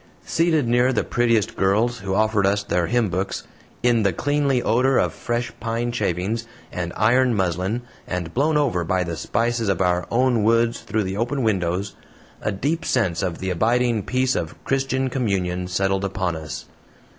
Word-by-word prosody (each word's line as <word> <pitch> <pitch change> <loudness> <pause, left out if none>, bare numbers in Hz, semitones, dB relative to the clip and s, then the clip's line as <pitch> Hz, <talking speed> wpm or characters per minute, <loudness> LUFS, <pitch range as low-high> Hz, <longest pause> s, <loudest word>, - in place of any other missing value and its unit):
Seated 160 -5 +2
near 120 +2 +3
the 120 - +1
prettiest 115 -3 +1
girls, 110 +5 +1
who 95 0 -2
offered 110 -1 +2
us 100 +1 +1
their 90 -3 0
hymn 120 -4 +1
books 95 +3 -2 0.4
in 120 -2 +4
the 100 -2 +2
cleanly 145 - +1
odor 125 +4 +3
of - - +1
fresh 120 0 -3
pine 115 +1 -2
shavings, 110 +1 -2 0.2
and 85 -1 -3
ironed 125 +2 +3
muslin, 95 +5 -1 0.2
and 90 -2 -4
blown 150 +4 +2
over 120 -12 +1
by 90 +2 0
the 85 -1 -4
spices 115 +6 -1
of 95 - +1
our 90 -1 +1
own 125 -1 +2
woods 115 +2 +2
through 110 -1 -1
the 95 +1 -3
open 125 +4 -1
windows, 95 -2 0 0.5
a - - -1
deep 145 - -1
sense 100 -10 0
of 90 -4 -2
the 95 0 -3
abiding 115 +4 +2
peace 130 +5 0
of - - -3
Christian 135 -1 0
communion 95 -8 -1
settled 95 +1 0
upon 95 -3 -1
us. 80 0 -6
110 Hz, 170 wpm, -22 LUFS, 95-120 Hz, 0.5 s, in